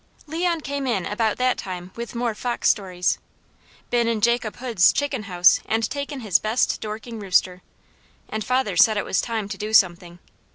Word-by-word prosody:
Leon 335 +1 -1
came 280 -1 -3
in 200 -8 0
about 215 0 -1
that 255 0 +1
time 180 -1 -6
with 235 +1 -7
more 235 -1 -1
fox 240 +3 -2
stories. 185 -3 +1 0.7
Been 235 -1 +2
in 230 -1 0
Jacob 235 0 +1
Hood's 235 -8 +3
chicken 280 -6 -2
house 180 0 +5
and 225 0 +1
taken 280 -1 -5
his 200 -6 +3
best 220 +3 0
Dorking 220 +2 -6
rooster, 185 -2 +1 0.7
and 220 0 -4
father 250 -6 0
said 215 +5 +5
it 205 - -1
was - - +1
time 225 -4 -3
to - - -6
do 215 +1 -4
something. 175 -3 +2
220 Hz, 175 wpm, -23 LUFS, 195-245 Hz, 0.7 s, house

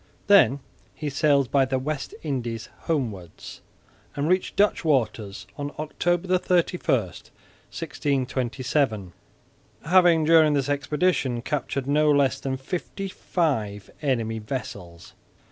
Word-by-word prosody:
Then 140 - +5 0.3
he 150 -2 -4
sailed 140 -3 +2
by 135 -1 +4
the 130 0 -1
West 145 +2 -4
Indies 120 -7 -3 0.2
homewards 110 - -4 0.5
and 145 +1 -1
reached 185 +2 +1
Dutch 205 +1 +2
waters 110 -9 0
on 145 0 -3
October 175 +4 0
31, 180 -6 +1
1627, 125 - -3 0.7
having 175 -1 +5
during 160 -1 +6
this 140 -1 0
expedition 140 -3 0
captured 135 -2 -2
no 150 +2 +3
less 140 -2 +3
than 130 -1 -3
fifty 180 +7 -5
five 110 - -2
enemy 115 -6 -1
vessels. 100 -8 -7
140 Hz, 110 wpm, -25 LUFS, 120-155 Hz, 0.7 s, during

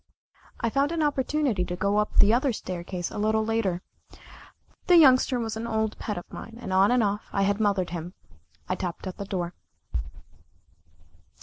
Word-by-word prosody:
I 230 - 0
found 280 +4 +1
an 330 -2 0
opportunity 280 -7 +1
to 180 0 -4
go 200 +3 +1
up 210 0 0
the 205 +2 +6
other 260 +3 +2
staircase 180 -2 -5
a - - -5
little 220 +1 +1
later 215 -6 0 1.0
the 355 - +7
Youngster 260 -4 +6
was 225 -2 -3
an 225 +1 -4
old 220 -1 -1
pet 210 - -3
of 175 - -5
mine, 230 - -8
and 190 -6 -5
off 190 +2 +5
and 245 -2 +3
on, 205 0 0
I 195 - +1
had 200 +1 +1
mothered 200 -5 +1
him. 175 +1 -6 0.5
I - - 0
tapped 180 0 -4
at 185 - -6
the 200 - -5
door. 180 -3 -3
210 Hz, 180 wpm, -26 LUFS, 185-235 Hz, 1.0 s, the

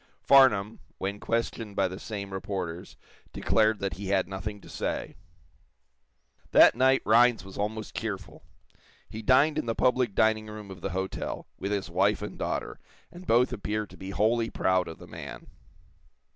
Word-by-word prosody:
Farnum, 115 -6 +5 0.2
when 100 +2 -3
questioned 115 -2 -2
by 95 - +2
the 95 +1 -7
same 100 -3 -6
reporters, 95 -3 -5 0.4
declared 110 0 +2
that 100 -2 -3
he 100 0 -6
had 95 -2 +1
nothing 105 +2 -5
to - - -15
say. - - -4 1.4
That - - +8
night 130 +2 +3
Rhinds 115 -1 +4
was 95 - -11
almost 105 +1 -4
cheerful. 100 -5 -5 0.7
He 110 - -7
dined 135 +7 +4
in - - -4
the 115 - -1
public 125 -4 +1
dining 110 0 +2
room 105 -2 -9
of 90 -2 -10
the 95 - -3
hotel, 95 +1 -4
with 100 - -3
his 100 -3 -1
wife 100 +4 +2
and 105 - -6
daughter, - - -3 0.3
and 180 +1 -12
both 125 +2 +3
appeared 105 -1 -3
to - - -12
be 95 - -8
wholly 115 +3 +1
proud 95 -1 +1
of 80 - -8
the - - -12
man. - - -9
105 Hz, 165 wpm, -28 LUFS, 95-115 Hz, 1.4 s, That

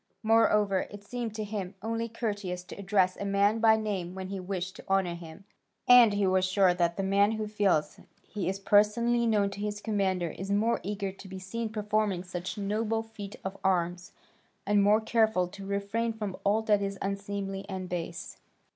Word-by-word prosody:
Moreover 210 -3 +3
it 205 0 -10
seemed 235 0 -5
to 215 - -3
him 200 -2 -5
only 230 +1 -2
courteous 205 -6 -3
to - - -10
address 190 -2 +2
a - - -6
man 200 +2 +2
by 220 -1 +6
name 195 -5 -3
when 190 0 -6
he 195 -1 -4
wished 185 0 -4
to - - -11
honour 190 -2 +2
him. 170 +1 -10 0.4
And 245 -4 +8
he 205 -1 +1
was 185 0 +3
sure 185 -1 +3
that 170 -1 0
the 195 - -1
man 200 +2 +3
who 215 -1 -2
feels 195 -8 +1 0.2
he 195 -4 -3
is 195 +1 -3
personally 230 +4 +3
known 205 -3 +2
to 200 - -8
his 210 0 -3
commander 190 -6 0
is 190 +5 -7
more 215 +3 +2
eager 200 +1 -3
to 195 +1 -13
be 190 0 -7
seen 220 +5 -4
performing 210 -3 -1
some 185 +3 -5
noble 225 +2 0
feat 205 -3 -9
of 190 +1 -4
arms, 180 0 0 0.5
and 205 0 +3
more 210 +2 +4
careful 220 -5 +2
to 195 +1 -9
refrain 200 +4 -1
from 210 -4 -4
all 210 +2 +2
that 210 -2 +3
is 195 0 -3
unseemly 195 0 -3
and 190 -1 -4
base. 175 -1 -5
200 Hz, 190 wpm, -29 LUFS, 190-215 Hz, 0.5 s, And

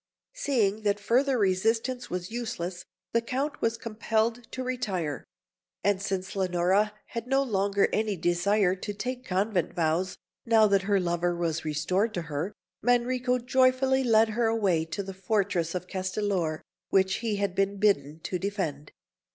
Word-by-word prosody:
Seeing 220 -7 +1
that 205 -1 +1
further 255 +6 +2
resistance 225 +5 +1
was 180 +1 -4
useless, 185 -7 -4 0.3
the 230 - +3
Count 270 +5 -3
was 230 0 +1
compelled 225 +1 -1
to 260 - -4
retire; 190 - -2 0.6
and 200 -1 +2
since 195 -1 -3
Leonora 190 +2 +2 0.2
had 230 0 -5
no 270 +1 +3
longer 200 -4 +2
any 215 -2 +1
desire 180 +3 +2
to 205 +2 -5
take 250 +4 -4
convent 190 -3 0
vows, 170 +3 0 0.3
now 225 -2 +5
that 200 -2 +3
her 200 -1 +4
lover 175 0 0
was 165 -2 -1
restored 180 +8 0
to 175 - -2
her, 160 +4 -3 0.3
Manrico 250 +1 +2
joyfully 260 +1 +3
led 225 -2 +4
her 230 +1 +1
away 195 -8 +1
to 165 +5 -4
the 195 0 -7
fortress 190 -3 0
of 180 - -3
Castellor 185 -3 -2 0.3
which 190 -1 +3
he 225 -3 -1
had 200 -2 -1
been 195 +1 0
bidden 160 -7 +1
to 180 - -3
defend. 170 -8 -3
200 Hz, 150 wpm, -28 LUFS, 180-230 Hz, 0.6 s, now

